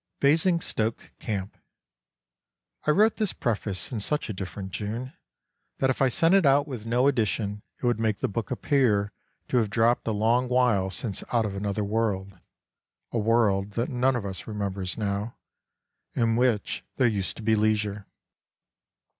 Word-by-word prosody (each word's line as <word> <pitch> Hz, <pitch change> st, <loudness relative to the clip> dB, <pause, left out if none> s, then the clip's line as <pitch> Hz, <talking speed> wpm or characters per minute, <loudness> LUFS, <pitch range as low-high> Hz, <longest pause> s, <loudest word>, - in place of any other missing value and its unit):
Basingstoke 155 Hz, -7 st, +1 dB
Camp. 100 Hz, -2 st, -4 dB, 1.3 s
I -, -, +4 dB
WROTE 215 Hz, +8 st, +4 dB
this 215 Hz, -4 st, 0 dB
preface 105 Hz, -4 st, -1 dB
in 115 Hz, -, -2 dB
such 150 Hz, +7 st, +1 dB
a -, -, -2 dB
different 95 Hz, +1 st, -6 dB
June, 115 Hz, +7 st, -4 dB, 0.6 s
that 135 Hz, -1 st, +2 dB
if 130 Hz, -, -4 dB
I 135 Hz, -, +5 dB
sent 165 Hz, +7 st, +3 dB
it 195 Hz, -1 st, +5 dB
out 140 Hz, +1 st, +4 dB
with 120 Hz, -6 st, -6 dB
no 125 Hz, +3 st, +3 dB
addition 105 Hz, -4 st, 0 dB, 0.2 s
it -, -, -6 dB
would 120 Hz, -2 st, +2 dB
make 110 Hz, -2 st, +1 dB
the -, -, -1 dB
book 110 Hz, +2 st, -4 dB
appear 120 Hz, -6 st, +1 dB, 0.4 s
to 125 Hz, -, +2 dB
have 110 Hz, -4 st, +2 dB
dropped 115 Hz, +4 st, +2 dB
a -, -, +2 dB
long 115 Hz, +4 st, +2 dB
while 120 Hz, -7 st, +2 dB
since 95 Hz, +3 st, -2 dB
out 115 Hz, -2 st, +2 dB
of 100 Hz, -, -3 dB
another 100 Hz, +1 st, -2 dB
world, 100 Hz, -2 st, -1 dB, 0.8 s
a 115 Hz, -, 0 dB
world 105 Hz, -3 st, +2 dB
that 115 Hz, +3 st, -1 dB
none 130 Hz, +1 st, +1 dB
of 115 Hz, -4 st, -3 dB
us 95 Hz, -1 st, -6 dB
remembers 100 Hz, -3 st, -2 dB
now, 105 Hz, +1 st, -3 dB, 0.8 s
in 115 Hz, -1 st, +2 dB
which 120 Hz, -4 st, +1 dB
there 130 Hz, -, +2 dB
used 100 Hz, -5 st, -2 dB
to 115 Hz, -, -8 dB
be 110 Hz, 0 st, +3 dB
leisure. 105 Hz, -2 st, 0 dB
110 Hz, 165 wpm, -26 LUFS, 100-125 Hz, 1.3 s, I